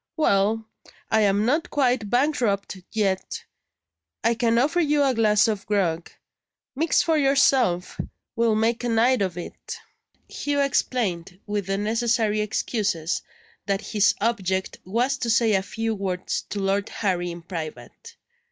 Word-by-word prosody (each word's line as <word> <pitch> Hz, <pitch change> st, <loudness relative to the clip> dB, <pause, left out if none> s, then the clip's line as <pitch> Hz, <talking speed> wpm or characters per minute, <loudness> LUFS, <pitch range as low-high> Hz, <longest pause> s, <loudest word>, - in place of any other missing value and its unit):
Well! 220 Hz, -5 st, +2 dB, 0.4 s
I 220 Hz, -1 st, +4 dB
am 205 Hz, 0 st, +2 dB
not 305 Hz, +8 st, +1 dB
quite 250 Hz, -7 st, +1 dB
bankrupt 245 Hz, -7 st, +1 dB, 0.2 s
yet; 195 Hz, -4 st, -1 dB, 0.8 s
I 230 Hz, +1 st, +3 dB
can 230 Hz, 0 st, +1 dB
offer 290 Hz, +8 st, +2 dB
you 300 Hz, -3 st, +3 dB
a 270 Hz, -2 st, +2 dB
glass 215 Hz, -2 st, +3 dB
of 210 Hz, -3 st, -2 dB
grog. 175 Hz, -5 st, 0 dB, 0.7 s
Mix 315 Hz, +4 st, +2 dB
for 320 Hz, -2 st, +2 dB
yourself 270 Hz, -9 st, +2 dB, 0.4 s
we'll 230 Hz, -1 st, +2 dB
make 225 Hz, +2 st, +1 dB
a 240 Hz, -, -1 dB
night 235 Hz, +1 st, +3 dB
of 185 Hz, -3 st, -1 dB
it." 175 Hz, -, -7 dB, 0.5 s
Hugh 290 Hz, 0 st, -2 dB
explained 195 Hz, -10 st, -1 dB
(with 205 Hz, -2 st, -3 dB
the 195 Hz, 0 st, 0 dB
necessary 220 Hz, 0 st, +1 dB
excuses) 205 Hz, -5 st, -1 dB, 0.5 s
that 195 Hz, 0 st, 0 dB
his 210 Hz, -1 st, +3 dB
object 190 Hz, -4 st, -1 dB
was 245 Hz, +8 st, 0 dB
to 235 Hz, -, -2 dB
say 225 Hz, -1 st, +3 dB
a 190 Hz, -, +3 dB
few 225 Hz, +3 st, -3 dB
words 190 Hz, -3 st, -2 dB
to 205 Hz, -, -3 dB
Lord 195 Hz, +1 st, 0 dB
Harry 180 Hz, -4 st, -1 dB
in 170 Hz, 0 st, -8 dB
private. 155 Hz, -8 st, -8 dB
215 Hz, 145 wpm, -24 LUFS, 195-240 Hz, 0.8 s, I